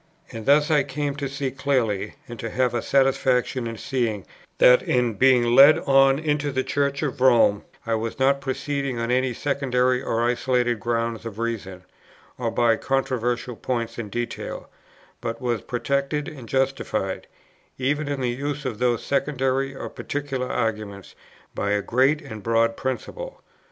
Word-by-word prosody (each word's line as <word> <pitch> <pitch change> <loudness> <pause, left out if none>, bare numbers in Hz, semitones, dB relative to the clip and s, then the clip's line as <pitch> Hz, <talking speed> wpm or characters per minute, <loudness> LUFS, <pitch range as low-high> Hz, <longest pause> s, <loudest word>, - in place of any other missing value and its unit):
And 115 -2 -8
thus 145 +2 +4
I 150 -2 +5
came 140 +1 -3
to 140 -2 -3
see 140 -1 -3
clearly, 125 -7 -1
and 120 -2 -9
to 115 - -4
have 125 0 0
a 120 - 0
satisfaction 130 -2 +1
in 115 -1 -6
seeing, 115 -6 -2 0.3
that, 125 0 +7
in 125 -2 +1
being 120 +1 +4
led 140 +4 +8
on 135 -1 +4
into 150 -1 -1
the 130 0 -1
Church 140 +1 -1
of 135 -3 -3
Rome, 120 -5 +4 0.2
I 115 - -1
was 115 0 -2
not 140 +1 +2
proceeding 140 -1 -2
on 115 +1 -2
any 130 0 +2
secondary 130 -1 0
or 115 -3 -1
isolated 120 -1 +1
grounds 115 +1 -2
of 115 -3 -7
reason, 105 -6 -4 0.6
or 120 -2 0
by 115 -1 +2
controversial 125 -2 -1
points 115 -1 -3
in 105 -3 -5
detail, 120 +3 -5 0.5
but 115 0 -4
was 120 -4 -1
protected 140 +4 -1
and 135 -9 -9
justified, 130 -7 -1 0.5
even 145 +3 -1
in 140 -2 -2
the 125 - 0
use 145 +3 -4
of 115 -4 -3
those 120 -2 +1
secondary 135 -1 0
or - - -6
particular 135 -3 -4
arguments, 105 -4 -3 0.4
by 100 0 -1
a 105 -1 0
great 135 +5 +2
and 110 -7 -8
broad 115 +1 +2
principle. - - -5
125 Hz, 160 wpm, -24 LUFS, 115-140 Hz, 0.6 s, led